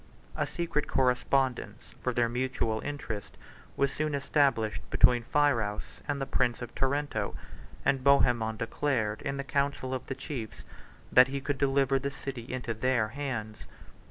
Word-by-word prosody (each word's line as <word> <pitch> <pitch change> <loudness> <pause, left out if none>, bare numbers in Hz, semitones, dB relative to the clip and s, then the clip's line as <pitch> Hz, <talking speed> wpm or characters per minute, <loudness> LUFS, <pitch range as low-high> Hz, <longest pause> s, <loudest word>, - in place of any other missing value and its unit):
A - - 0
secret 170 -4 -2
correspondence, 125 -3 0
for 125 - 0
their 120 -1 +2
mutual 120 -2 -1
interest, 120 -8 -5 0.4
was 140 0 +2
soon 155 -1 -1
established 140 -6 +1
between 120 -1 +5
Phirouz 120 -9 0
and 145 -1 -1
the 135 - -1
prince 125 -3 +1
of 120 - -8
Tarento; 135 -6 -1 0.5
and 135 -2 +2
Bohemond 120 -5 +3
declared 115 -2 -1
in 140 0 -3
the 140 - -2
council 140 -1 -1
of 130 - -4
the 135 - -3
chiefs, 125 -9 -6 0.5
that 125 +1 +8
he 140 +1 -3
could 140 0 -3
deliver 135 -1 +3
the 140 +1 -2
city 135 -3 -7
into 125 -2 -3
their 115 -1 +1
hands. 115 -5 -5
130 Hz, 150 wpm, -29 LUFS, 115-140 Hz, 0.5 s, that